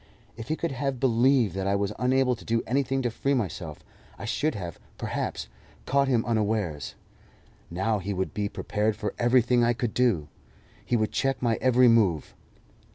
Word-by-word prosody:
If 115 +1 -8
he 155 - 0
could 170 -1 -3
have 135 -1 -2
believed 125 -3 +3
that 95 0 -2
I 100 - +2
was 100 +1 -1
unable 125 0 +2
to 115 - -14
do 115 0 0
anything 135 +1 0
to 120 - 0
free 140 +4 0
myself, 90 - -4 0.3
I - - -7
should 155 0 0
have, 90 -5 -6 0.2
perhaps, - - -3 0.4
caught 140 +1 +2
him 120 -4 +2
unawares. 105 -9 -1 0.7
Now 105 +5 0
he 100 +2 -4
would 95 -1 -2
be 105 -1 -2
prepared 105 +1 -1
for 105 0 -4
everything 120 0 +3
I 120 +1 +3
could 120 -2 -3
do; 110 -13 +2 0.6
he 120 - 0
would 110 -2 +1
check 135 +1 0
my 115 -2 +1
every 125 -1 +5
move. 100 - +3
115 Hz, 175 wpm, -27 LUFS, 100-130 Hz, 0.7 s, every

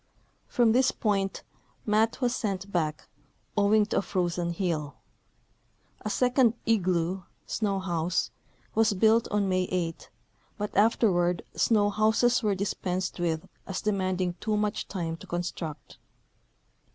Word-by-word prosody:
From 235 -2 +3
this 255 +3 +4
point 195 -3 -1 0.4
Matt 220 +4 +2
was 245 -1 +1
sent 195 -3 -3
back, 155 -4 -1 0.5
owing 210 +1 +4
to - - 0
a - - 0
Irozen 175 -2 -1
heel. 165 -5 -2 1.1
A 215 - -3
second"" 250 0 +3
igloo 185 -4 +1
" - - -42
(snow 200 -3 0
house) 175 -2 -1 0.4
was 225 -1 +3
built 225 +4 +4
on 205 -1 +1
May 185 -1 +1
8, 170 -3 -2 0.5
but 210 -1 -4
afterward 185 -5 +3
snow 205 -3 +3
houses 220 +4 +3
were 210 -3 +1
dispensed 185 -2 -2
with 170 +1 -1 0.2
as 195 - -3
demanding 185 -3 0
too 215 -1 0
much 210 0 -1
time 165 -4 -3
to - - -13
construct. 175 -3 -5
195 Hz, 130 wpm, -28 LUFS, 175-215 Hz, 1.1 s, this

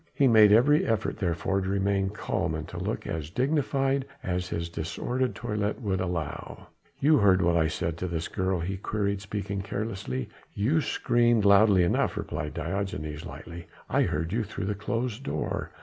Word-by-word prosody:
He 140 - +4
made 110 -3 +7
every 135 +8 +5
effort 115 -1 -1
therefore 95 +1 0
to 95 - -3
remain 100 0 +1
calm 95 -5 -2
and 80 0 -5
to 90 - -6
look 100 +5 -3
as 80 -2 -4
dignified 135 - 0 0.2
as 90 0 -2
his 85 0 -2
disordered 120 +10 -2
toilet 105 -2 -2
would 95 -6 -1
allow. 85 -5 -4 0.3
"You 150 0 +5
heard 95 -2 +5
what 85 0 +3
I 80 -2 +3
said 80 +1 -2
to 90 - -2
this 80 -2 -3
girl?" 95 -2 -1
he 95 +3 -3
queried, 100 0 -2
speaking 100 0 -4
carelessly. 95 - -4 0.3
"You 135 +11 +2
screamed 120 -6 +2
loudly 100 -2 +6
enough," 85 - +1
replied 75 +1 -4
Diogenes 85 -2 -3
lightly. 85 +2 -9 0.2
"I - - +3
heard 80 +4 -1
you 115 +1 +1
through 100 -1 -5
the 105 - 0
closed 115 +3 -3
door. - - -3
100 Hz, 170 wpm, -27 LUFS, 85-110 Hz, 0.3 s, made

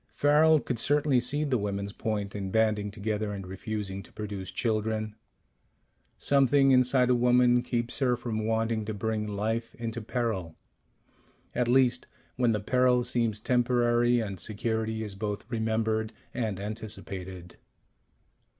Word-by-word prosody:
Farrel 155 +2 +5
could 125 -4 -3
certainly 145 0 +3
see 145 +5 0
the 135 -5 +1
women's 100 0 -3
point 105 -2 -3
in 100 -2 -4
banding 105 -1 +1
together 105 0 -3
and 95 -2 -6
refusing 95 +1 -5
to 90 - -17
produce 105 -3 -6
children. 110 -1 -1 1.0
Something 140 0 +4
inside 125 0 +4
a - - +5
woman 125 0 +4
keeps 120 0 -2
her 125 -3 +2
from 110 -2 -3
wanting 115 0 0
to 110 0 -4
bring 110 +1 -2
life 110 +3 -2
into 115 -1 -4
peril 110 -8 -2 1.0
at 125 - 0
least, 125 0 +3 0.3
when 125 -2 +2
the 105 - 0
peril 125 +3 +2
seems 115 -3 0
temporary, 120 0 +2
and 100 -5 -4
security 110 +2 -2
is 105 -2 -6
both 105 +1 -4
remembered 110 -1 0 0.2
and 110 -6 -2
anticipated. 100 -4 -7
110 Hz, 135 wpm, -28 LUFS, 105-125 Hz, 1.0 s, Farrel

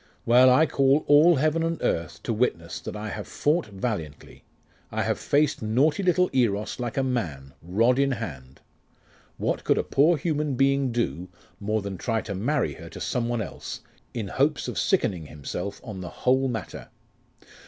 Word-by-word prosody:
Well 125 +2 +6
I 130 +5 +5
call 140 0 +2
all 155 +4 +6
heaven 155 +3 +1
and 165 0 -1
earth 80 -2 -2
to 115 - -1
witness, 105 -8 -1
that - - -7
I 105 +1 -5
have 105 0 -6
fought 155 +1 0
valiantly. 95 -8 -5 0.5
I - - -1
have - - -1
faced 145 0 +1
naughty 130 - +2
little 180 -1 +3
Eros 110 -5 0
like 120 0 -4
a 135 - +2
man, 80 - -3
rod 115 +9 +2
in 140 -1 +2
hand. 70 - -7 0.8
What - - -1
could - - +2
a - - +1
poor 155 +4 +3
human 150 -2 -1
being 135 0 +2
do 90 - -2 0.3
more 105 +1 -1
than 100 -2 -5
try 115 -2 -1
to 100 - -5
marry 115 - 0
her - - -11
to - - -10
some 120 -1 -1
one 120 -2 -1
else, - - -7 0.3
in 110 -5 -4
hopes 145 +8 +1
of - - -3
sickening 95 - 0
himself 90 +7 -6
of 105 -6 -7
the 90 - -6
whole 130 +6 +1
matter? 110 -6 -5
120 Hz, 175 wpm, -25 LUFS, 100-140 Hz, 0.8 s, Well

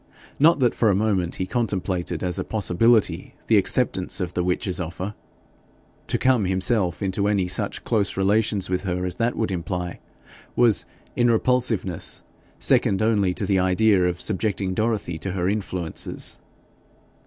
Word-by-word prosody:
Not 160 +4 +6
that 125 - +3
for 115 - +2
a 100 - +3
moment 95 -4 0
he 95 - -2
contemplated 95 -6 -2
as 90 -2 -1
a - - -1
possibility 110 +2 +1
the - - +4
acceptance - - +1
of - - -3
the 90 - -1
witch's 90 +1 -1
offer. 90 +4 -5 0.9
To - - 0
come 130 -6 +2
himself 95 0 0
into 100 +1 0
any 100 -3 +1
such 90 - -3
close 105 -6 0
relations 100 0 +1
with 90 0 -1
her 90 -1 -2
as 90 -1 -4
that 115 +1 0
would 110 -3 -1
imply, 90 0 -4 0.6
was 115 -8 +3 0.3
in 120 0 +3
repulsiveness 115 -6 0 0.3
second 100 +2 +2
only 105 -4 +2
to - - -1
the 95 -2 +2
idea 95 0 +3
of 90 0 -2
subjecting 100 -2 -1
Dorothy 105 -5 -1
to 95 +2 -4
her 90 -1 -1
influences. 95 -4 -2
95 Hz, 155 wpm, -23 LUFS, 90-110 Hz, 0.9 s, Not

